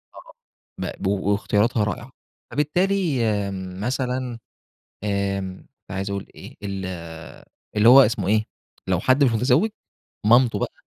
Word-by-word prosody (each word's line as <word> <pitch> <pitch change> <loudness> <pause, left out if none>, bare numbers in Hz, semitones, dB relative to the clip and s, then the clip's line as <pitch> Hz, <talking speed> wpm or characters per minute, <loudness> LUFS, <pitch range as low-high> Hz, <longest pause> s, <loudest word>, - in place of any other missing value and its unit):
آه - - -14 0.4
مقب 95 - -4
واختياراتها 100 +3 +1
رائعة، 115 +5 -4 0.4
فبالتالي 165 -3 +1
آمم، 95 -3 -3
مثلًا 125 0 -2 0.6
آمم، 100 -2 -2 0.2
كنت - - -14
عايز 95 +1 -3
أقول 100 -1 -4
إيه، - - -11
ال 100 -1 -4 0.9
اللي 105 +2 +6
هو 135 +2 +10
اسمه 105 -6 +1
إيه 110 +1 +2 0.4
لو 90 -2 +1
حد 130 +6 +3
مش 125 - +4
متزوج 125 - +3 0.6
مامته 115 -2 +5
بقى، - - -2
105 Hz, 125 wpm, -23 LUFS, 100-130 Hz, 0.9 s, هو